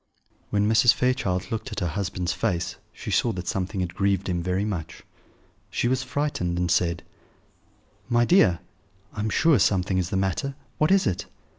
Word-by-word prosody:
When 105 0 +1
Mrs. 115 +2 +5
Fairchild 125 -8 0
looked 115 - -4
at - - -3
her 90 - -1
husband's 90 0 -2
face 90 -7 -2
she - - -7
saw 120 - +2
that 90 -1 -6
something 95 +1 -2
had 85 -1 -3
grieved 100 0 0
him 90 -2 -1
very 90 +3 -1
much. 85 -8 -5 0.7
She - - 0
was 130 +1 +1
frightened, 130 -10 -2
and 90 -1 0
said: 85 -1 +1 1.1
"My 120 0 +3
dear, 95 - +4 0.5
I - - -8
am 110 +1 0
sure 160 +1 +4
something 95 -1 +2
is 90 -1 -1
the 95 - -1
matter; 95 +9 -1 0.2
what 155 - +3
is 195 0 +4
it? 95 - -1
95 Hz, 175 wpm, -25 LUFS, 90-120 Hz, 1.1 s, Mrs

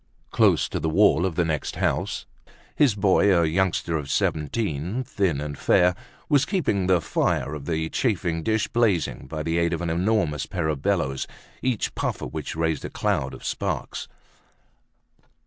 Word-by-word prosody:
Close - - +4
to - - -3
the 80 - -1
wall 90 -1 +4
of 85 - -5
the 90 - +2
next 75 -3 -2
house, - - -1 0.5
his 140 -8 +4
boy, 100 0 +4
a 85 -3 +4
youngster 85 0 0
of 70 -2 -5
seventeen, 80 - -1
thin 95 - 0
and 75 -1 -5
fair, 90 +1 +4 0.3
was 145 -3 +4
keeping 110 - 0
the 95 -2 +4
fire 75 -2 0
of 75 -2 -6
the 80 0 -1
chafing 90 -9 0
dish 110 +5 0
blazing 105 -10 0
by 80 -1 -4
the 80 +2 0
aid 85 0 +1
of 85 - -2
an 85 - -1
enormous 85 -5 0
pair 85 -4 -2
of 75 -3 -2
bellows, 75 -8 0 0.3
each 125 -5 -1
puff - - -2
of - - -6
which - - -4
raised 80 -2 -1
a - - -4
cloud - - -1
of - - -12
sparks. - - -3
85 Hz, 170 wpm, -25 LUFS, 80-100 Hz, 0.5 s, Close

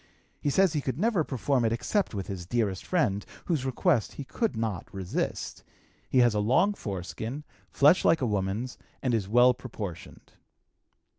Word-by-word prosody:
He 145 - 0
says 190 +3 +3
he 150 - 0
could 130 -2 -3
never 205 -2 +2
perform 130 -1 0
it 110 - +2
except 175 - 0
with 95 -2 -3
his 90 -3 -6
dearest 105 -4 0
friend, 105 - +1 0.2
whose 150 -7 0
request 120 -3 +1
he 140 - -6
could 225 - -2
not 110 -6 -3
resist. 95 -2 -3 0.5
He - - +1
has 120 -2 +4
a 105 - +1
long 130 - +3
foreskin, 100 - -5 0.3
flesh 150 +6 +5
like 165 - +4
a 130 - 0
woman's, 105 +3 -2 0.2
and 125 -2 +1
is 100 -4 0
well 125 +3 +6
proportioned. 110 -9 -8
120 Hz, 165 wpm, -28 LUFS, 100-145 Hz, 0.5 s, well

